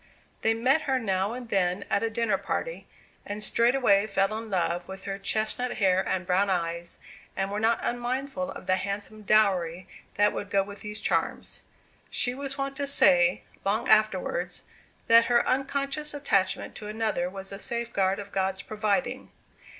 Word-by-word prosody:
They 225 0 +2
met 260 +7 +3
her 265 - +3
now 195 -2 0
and 245 -1 -7
then 185 -1 0
at - - +1
a 230 - 0
dinner 230 -1 0
party, - - -4 0.4
and 205 +1 -5
straightway 230 -4 +3
fell 200 +1 +1
in 225 0 -6
love 175 -2 -1
with 190 0 -9
her 195 0 -4
chestnut 220 +5 0
hair 190 -4 +3
and 185 -1 -2
brown 190 +2 +2
eyes, 170 -1 -2 0.4
and 195 +1 -1
were 205 - -2
not 225 +2 +3
unmindful 265 +3 -2
of - - -8
the 185 0 +2
handsome 205 +2 -4
dowry 185 -5 +2 0.3
that 205 +1 +3
would 200 - -5
go 195 -1 +2
with 200 0 -10
these 210 0 -6
charms. - - -2 0.5
She 245 - +1
was 275 +1 -5
wont 275 0 -3
to 280 - -2
say, 180 -10 +4 0.2
long 205 +3 0
afterwards, 190 -4 +1 0.4
that 230 0 +7
her 240 0 +3
unconscious 275 +3 0
attachment 200 -10 0
to 210 - -8
another 215 -5 -1
was 195 +1 -7
a 195 - -7
safeguard 200 -3 -1
of 200 0 -8
God's 190 0 -1
providing. 215 +4 -1
210 Hz, 165 wpm, -27 LUFS, 190-240 Hz, 0.5 s, that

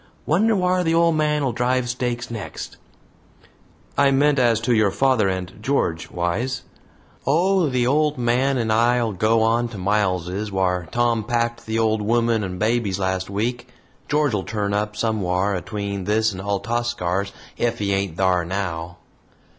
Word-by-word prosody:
Wonder 215 +8 +3
whar 180 -1 +1
the 165 -1 +1
ole 170 0 +4
man'll 150 -3 +1
drive 125 +2 0
stakes 120 -1 -3
next." 110 -4 -7 1.2
"I 140 -1 +4
meant 140 +1 +3
as 120 -3 +3
to 120 +1 +1
your 110 -3 +3
father 130 -1 +2
and 95 -1 -4
George, 105 -10 -1
Wise." 105 +10 -2 0.6
"Oh, 175 +3 +3
the 125 -2 +1
old 150 +2 +2
man 125 +3 +1
and 110 -2 0
I'll 120 0 +2
go 110 +4 +2
on 115 +2 +2
to 115 -3 -9
'Miles's,' 95 0 -1
whar 90 -3 0
Tom 120 -2 +1
packed 120 0 -2
the 110 0 -1
old 110 -1 +1
woman 115 0 +1
and 90 -1 -4
babies 110 -2 0
last 95 -1 -2
week. 120 +5 -2 0.4
George'll 145 -9 +1
turn 105 -1 -2
up 105 0 -1
somewhar 100 -3 0
atween 100 0 -4
this 110 +1 +2
and 95 - -6
Altascar's 100 -2 -1 0.3
ef 120 -1 0
he 100 -2 -1
ain't 95 -4 -2
thar 95 -2 +2
now." 85 -2 -4
115 Hz, 155 wpm, -22 LUFS, 100-125 Hz, 1.2 s, ole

